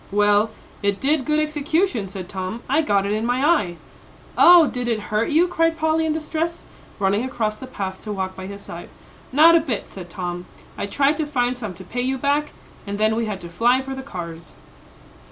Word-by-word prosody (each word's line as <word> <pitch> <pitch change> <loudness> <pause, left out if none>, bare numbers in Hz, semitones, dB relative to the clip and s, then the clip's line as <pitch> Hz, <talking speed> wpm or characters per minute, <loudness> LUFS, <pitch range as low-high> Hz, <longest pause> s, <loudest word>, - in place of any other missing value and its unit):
"Well, 205 +1 +3 0.3
it 200 -1 0
did 280 -1 +2
good 305 0 +2
execution," 305 - 0
said 185 -1 -7
Tom; 190 +5 -5
"I 280 +5 +3
got 200 -10 +1
it 200 - -1
in 215 +1 -1
my 245 +4 +1
eye." 210 - +2 0.6
"Oh, 350 -2 +8
did 250 -4 -3
it 230 -2 0
hurt 215 +2 +1
you?" 325 +4 +4
cried 330 -1 +1
Polly, 320 0 +1
in 310 - +1
distress, 320 +2 -3 0.3
running 200 +3 +1
across 230 -5 -2
the 260 - -10
path 190 -6 -5
to 210 - -4
walk 190 -2 -3
by 190 0 -7
his 200 0 -8
side. - - -9 0.4
"Not 320 +5 +7
a - - +6
bit," 270 -9 -3
said 180 -2 -9
Tom. 175 0 -5 0.3
"I - - -3
tried 280 +7 +2
to 310 - -1
find 250 -3 0
some 215 -7 -6
to 190 - -10
pay 240 +7 -3
you 260 +1 0
back, 285 +3 0 0.3
and 200 0 -3
then 215 +1 +2
we 230 0 -1
had 205 -3 -4
to 170 - -7
fly 240 +9 +3
for 265 0 -5
the 265 - -6
cars." 170 - -8
240 Hz, 210 wpm, -22 LUFS, 200-300 Hz, 0.6 s, Oh